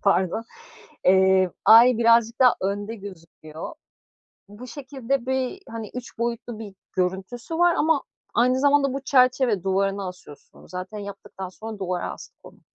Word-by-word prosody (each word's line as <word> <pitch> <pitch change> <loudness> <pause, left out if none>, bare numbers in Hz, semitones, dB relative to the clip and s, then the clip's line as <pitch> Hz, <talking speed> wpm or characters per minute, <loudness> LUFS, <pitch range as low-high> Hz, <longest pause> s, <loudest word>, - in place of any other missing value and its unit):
pardon. 195 +2 +2 0.6
Eee, 190 -1 +4
ay 235 +2 +8
birazcık 230 0 +3
daha 250 -2 +6
önde 205 +3 -2
gözüküyor. 165 - -10 0.7
Bu 210 +5 -11
şekilde 270 -1 -3
bir, 260 +8 -2
hani, 225 -2 -6
3 250 -2 -8
boyutlu 235 -1 -3
bir 205 -3 -8 0.2
görüntüsü 190 - -3
var 350 0 +4
ama, 315 -2 +2 0.3
aynı 255 +2 +3
zamanda 280 -1 +3
bu 275 - -2
çerçeve, 255 -7 +3
duvarına 195 0 0
asıyorsun 180 -5 -12
onu - - -16
zaten 185 +3 -6
yaptıktan 200 -2 -8
sonra 215 +2 -9
duvara 180 -2 -2
astık - - -13
onu. - - -16
220 Hz, 140 wpm, -24 LUFS, 190-255 Hz, 0.7 s, ay